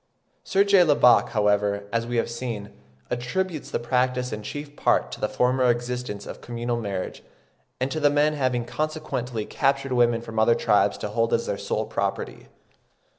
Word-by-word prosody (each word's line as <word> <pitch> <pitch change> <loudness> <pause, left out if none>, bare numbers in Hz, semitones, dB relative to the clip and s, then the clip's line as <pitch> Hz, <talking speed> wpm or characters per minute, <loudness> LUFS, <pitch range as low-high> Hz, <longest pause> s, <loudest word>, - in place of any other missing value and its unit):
Sir 195 +1 +3
J. 200 -2 +5
Lubbock, 145 -6 +5
however, 105 -1 +1
as 115 0 0
we 120 0 -2
have 115 - +1
seen, 115 -4 -5 0.4
attributes 155 +7 -2
the - - -1
practice 125 0 0
in 105 - -4
chief 145 +6 -7
part - - +1
to - - -8
the 105 - 0
former 125 +3 +2
existence 120 -3 -2
of - - -9
communal 120 0 -3
marriage, 100 -3 -4 0.6
and 130 +1 -1
to 155 - -2
the 145 -1 +4
men 150 +1 +2
having 130 -4 0
consequently 135 -6 -3
captured 135 -1 0
women 120 -1 +3
from 115 -1 -4
other 115 +1 +5
tribes 105 -3 +2
to - - -4
hold 115 +2 +1
as - - -2
their - - -1
sole - - -2
property. - - -3
120 Hz, 175 wpm, -25 LUFS, 115-135 Hz, 0.6 s, J